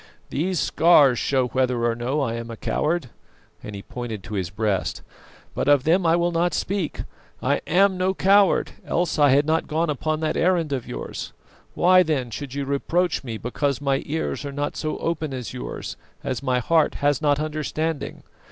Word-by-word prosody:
These 175 +4 0
scars 145 -7 +5
show 130 -2 +1
whether 125 -1 +1
or 120 - +2
no 125 +6 -1
I 115 -4 -1
am 115 0 -5
a 115 - -7
coward," 150 -1 -1 0.5
and 105 - -8
he 100 - -8
pointed 115 -5 -6
to 110 - -8
his 95 -4 -2
breast, 100 0 -1 0.5
"but - - -2
of 145 -3 +5
them 170 +2 +3
I 165 - +5
will 175 0 +1
not 170 +1 +1
speak. 190 -5 -2 0.4
I - - 0
am 190 +2 +3
no 190 +1 +1
coward, 195 0 +4
else 175 -2 -1
I 145 -1 +6
had 140 +2 +4
not 160 +1 +1
gone 160 0 0
upon 155 +2 -1
that 155 -1 0
errand 170 -4 +1
of 130 -3 -3
yours. - - -6 0.4
Why, 185 +1 +6
then, 145 -8 -1
should 135 +3 -6
you 140 -1 -2
reproach 165 +6 0
me 115 -4 -5
because 135 +4 -1
my 140 -1 0
ears 160 0 -2
are 140 - -5
not 145 +1 -3
so 155 -1 -3
open 160 -4 -2
as 125 -2 -6
yours, 125 - -6 0.3
as 130 - -2
my 130 -2 +1
heart 160 +6 +2
has 145 -1 +1
not 145 -2 +2
understanding? 155 0 -3
145 Hz, 190 wpm, -23 LUFS, 125-165 Hz, 0.5 s, I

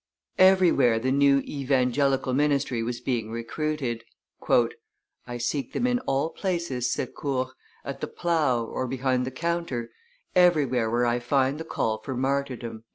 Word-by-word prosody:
Everywhere 180 -11 +5
the 130 +3 0
new 140 0 +4
Evangelical 135 -1 +1
ministry 140 -4 +1
was 120 +1 -3
being 115 -4 -2
recruited. 120 +1 -3 1.2
"I 120 0 -5
seek 125 +2 -2
them - - 0
in 245 0 +2
all 140 +4 0
places," 170 - -2
said - - -3
Court, 130 -3 -2 0.4
"at - - -6
the - - -2
plough, 155 -9 +1
or 130 +3 -3
behind 130 0 0
the - - -1
counter, 145 -5 -3 0.4
everywhere 145 -10 +3
where 120 +2 +1
I 120 0 +1
find 135 +3 +1
the 160 - -5
call 110 -7 -1
for 130 +3 -5
martyrdom." 130 -4 -2
130 Hz, 145 wpm, -26 LUFS, 120-150 Hz, 1.2 s, Everywhere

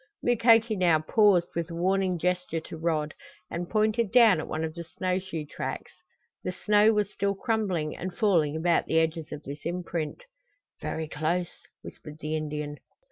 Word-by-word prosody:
Mukoki 230 -1 +4
now 175 -4 +4
paused 180 +2 +3
with 170 -1 -3
a 165 - -6
warning 185 +1 +1
gesture 180 -1 -1
to 160 - -9
Rod, 155 -2 -1 0.4
and 175 +1 -4
pointed 215 0 +1
down 225 -7 +6
at - - -5
one 155 +1 -3
of 160 -1 -3
the 170 +1 -6
snow 185 +2 -2
shoe 170 -5 -6
tracks. - - -5 0.5
The 185 - -2
snow 210 +3 +4
was 210 -2 0
still 200 0 -1
crumbling 190 -8 -1
and 185 +1 -5
falling 170 -9 +2
about 170 +1 +1
the 160 - +1
edges 160 -1 0
of 150 0 -7
this 140 +1 -8
imprint. 170 - -4 0.6
"Ver' 160 - -3
close!" 160 +4 -3 0.2
whispered 150 -1 -10
the 155 0 -3
Indian. 150 -1 -4
175 Hz, 170 wpm, -27 LUFS, 155-200 Hz, 0.6 s, down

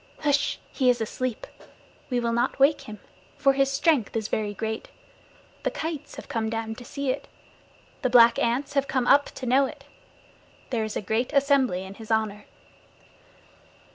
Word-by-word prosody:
Hsh! 285 0 +2
He 260 -3 +2
is 245 - +3
asleep. 235 +2 -3 0.6
We 250 -2 +1
will 235 -1 0
not 240 +2 0
wake 280 +3 +4
him, 210 - -7 0.4
for 275 -1 +4
his 275 0 +2
strength 275 -4 +1
is 220 -1 -2
very 210 -1 -1
great. 220 +2 -4 0.7
The - - 0
kites 315 -2 -5
have - - -9
come 225 -5 -2
down 225 0 -3
to 245 - -10
see 280 +2 -2
it. - - -5 0.7
The 255 - +1
black 235 -1 +6
ants 245 +4 0
have 275 -1 +1
come 260 -2 0
up 285 +3 +5
to 260 - -8
know 265 +3 +4
it. 285 0 -11 0.9
There 230 -3 0
is 215 -1 -4
a - - -2
great 220 +5 -1
assembly 275 -9 +3
in 190 0 -9
his 220 +1 -12
honor. 215 -2 -1
245 Hz, 170 wpm, -26 LUFS, 220-275 Hz, 0.9 s, black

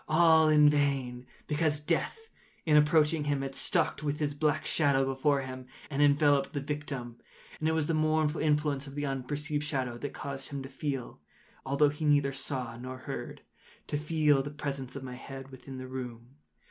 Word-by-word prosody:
All 160 0 +5
in 150 -1 +6
vain; 135 -4 +1 0.2
because 150 0 +1
Death, 150 - -1 0.5
in 155 -2 +4
approaching 150 0 +4
him 145 -2 0
had 135 0 -4
stalked 160 +5 0
with 150 -1 -1
his 150 -2 -1
black 150 0 0
shadow 140 -4 +3
before 135 +1 +1
him, 130 -1 -8 0.2
and 145 0 0
enveloped 145 0 +4
the 145 - -1
victim. 140 -4 -5 0.4
And 155 - +1
it - - +1
was 160 -2 +1
the 165 - 0
mournful 155 0 +1
influence 150 -2 +1
of 135 - -9
the 145 0 -2
unperceived 145 +3 -2
shadow 130 -5 -2
that 145 - -4
caused 135 -1 -5
him 140 -1 -5
to 135 - -8
feel—although 135 - -2
he 150 +2 -4
neither 145 -2 +3
saw 130 -3 -3
nor 130 +1 -7
heard—to 140 +2 -8
feel 150 -2 +3
the 140 - -5
presence 140 -3 -5
of 140 - -6
my 125 -1 -6
head 135 +1 -9
within 130 0 -9
the 130 0 -7
room. 125 -2 -7
145 Hz, 175 wpm, -30 LUFS, 135-150 Hz, 0.5 s, in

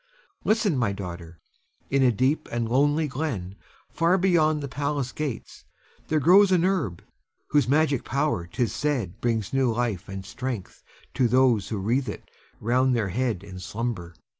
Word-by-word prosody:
Listen, 215 -6 +2
my 115 -5 +1
daughter! 85 -4 -7 0.5
In 140 0 +3
a 130 -2 +5
deep 130 +7 0
and 120 -1 -1
lonely 145 +6 +2
glen, 125 - -4 0.4
far 170 +3 +2
beyond 165 -5 +3
the - - -3
palace 140 -1 -2
gates, 145 -6 -5 0.4
there 155 - +2
grows 190 +7 +6
an 180 -1 +3
herb 155 - -1 0.5
whose 145 -3 +3
magic 145 -1 +2
power 140 - -1
'tis 115 +6 -1
said 120 -9 -2
brings 115 -2 -1
new 135 -3 +2
life 110 -6 -2
and 95 -1 -6
strength 125 -2 -5 0.3
to 130 -3 +2
those 125 -4 +3
who 110 - -2
wreathe 120 +6 0
it - - -8 0.3
round 125 +3 +2
their 110 -4 0
head 115 -2 -1
in 95 -2 -9
slumber. 95 -3 -4
125 Hz, 160 wpm, -25 LUFS, 105-150 Hz, 0.5 s, grows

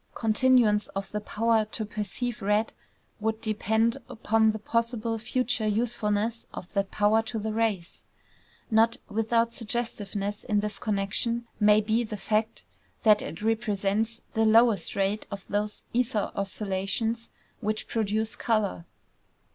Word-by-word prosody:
Continuance 225 -2 +3
of 195 -1 -4
the 210 - -2
power 225 +1 +2
to 215 +1 -4
perceive 215 +3 -3
red 210 +2 +1 0.5
would 220 +1 -1
depend 220 +1 +1
upon 220 0 +2
the 215 - -4
possible 230 +1 -1
future 245 -1 0
usefulness 220 0 0
of 180 - -8
that 200 -2 0
power 210 +2 +3
to 225 +1 -5
the 220 0 -2
race. 215 -6 -1 0.7
Not 225 +1 +4
without 230 +2 +1
suggestiveness 210 -3 -3
in 210 -1 +1
this 210 0 -3
connection 215 +3 -1
may 210 0 +6
be 220 +3 +1
the 215 -2 -5
fact 215 +2 -1 0.4
that 215 -2 +6
it 210 - -7
represents 220 0 0
the 225 - +2
lowest 220 -4 +4
rate 200 +2 0
of 200 -1 -7
those 210 +1 -2
ether 235 -3 0
oscillations 200 +3 -2 0.3
which 215 -1 -2
produce 220 0 -1
color. 215 -7 0
215 Hz, 130 wpm, -27 LUFS, 210-230 Hz, 0.7 s, may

